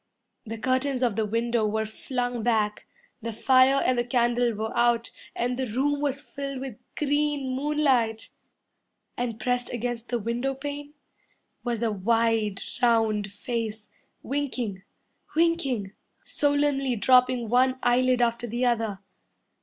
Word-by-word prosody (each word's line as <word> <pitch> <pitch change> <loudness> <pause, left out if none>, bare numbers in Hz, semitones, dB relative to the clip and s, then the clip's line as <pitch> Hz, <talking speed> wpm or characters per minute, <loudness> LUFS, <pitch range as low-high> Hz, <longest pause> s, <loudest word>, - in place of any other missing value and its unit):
The 225 +1 -5
curtains 260 +2 0
of 235 -5 +1
the 220 -1 0
window 230 +1 0
were 220 +1 -1
flung 245 +2 -3
back, 215 -2 0 0.3
The 230 +1 -3
fire 260 +4 +4
and 250 -1 +2
the - - +2
candle 240 -1 +2
were 220 +2 -4
out, 235 -1 +2 0.2
And 245 +1 -1
the 260 - -1
room 275 +6 0
was 280 0 -1
filled 275 -3 -5
with 260 -5 -7 0.2
green 290 -2 0
moonlight. 265 -6 +1 0.9
And 235 -2 -3
pressed 245 +2 0
against 240 0 -3
the 240 - 0
window 240 +5 -2
pane 290 +1 -6 0.7
Was 235 -2 -1
a 225 - +1
wide, 220 0 +1 0.2
round 220 -4 +2
face, 220 -1 -4 0.3
Winking 255 -8 -2 0.5
winking 290 - +1 0.3
Solemnly 285 -3 +1
dropping 250 +1 +4
one 255 +3 +3
eyelid 250 0 +3
after 235 0 0
the 240 +3 -1
other. 225 -5 0
245 Hz, 130 wpm, -26 LUFS, 225-265 Hz, 0.9 s, fire